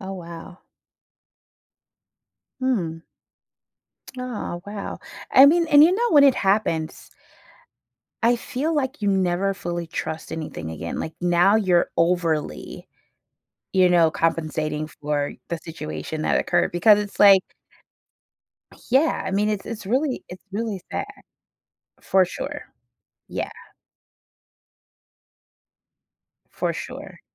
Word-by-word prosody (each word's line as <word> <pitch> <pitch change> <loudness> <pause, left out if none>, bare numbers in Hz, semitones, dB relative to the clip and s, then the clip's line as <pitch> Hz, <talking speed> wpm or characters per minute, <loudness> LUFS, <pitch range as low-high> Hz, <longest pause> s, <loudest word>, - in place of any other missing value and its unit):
Oh, 195 0 -6
wow. 175 0 -9 2.0
Mm. 175 -11 -1 1.2
Oh, 235 -8 -5
wow. 205 -1 -6 0.3
I 270 +2 +9
mean 335 +3 +4
and 295 0 +8
you 350 - +4
know, 475 +4 +1
when 290 -3 +7
it 270 - +6
happens 190 -6 -1 1.1
I 235 +1 +4
feel 285 +6 -3
like 275 -1 -2
you 205 - 0
never 190 0 +1
fully 175 -3 -4
trust 160 0 -5
anything 155 - -6
again, 80 +1 -5
like, 160 - -5
now 175 +4 +4
you're 185 -5 +2
overly 170 -3 -1 0.9
you 185 -1 +5
know, 170 -2 +4
compensating 155 -2 -1
for 145 -1 -3 0.2
the 170 - -2
situation 155 - -6
that - - +1
occurred, 175 0 +1
because 205 +4 +5
it's, 205 -1 -6
like 195 -2 +8 1.5
Yeah, 280 +6 +3
I - - -3
mean, 205 +2 +1
it's 205 -2 -3
it's 220 -3 -6
really 260 +5 -1
it's 180 - -11
really 215 -2 -3
sad. - - -2 1.0
For 190 -1 +3
sure. 180 - -6 0.7
Yeah. - - -4 3.0
For - - -2
sure. - - -8
190 Hz, 110 wpm, -23 LUFS, 165-225 Hz, 3.0 s, I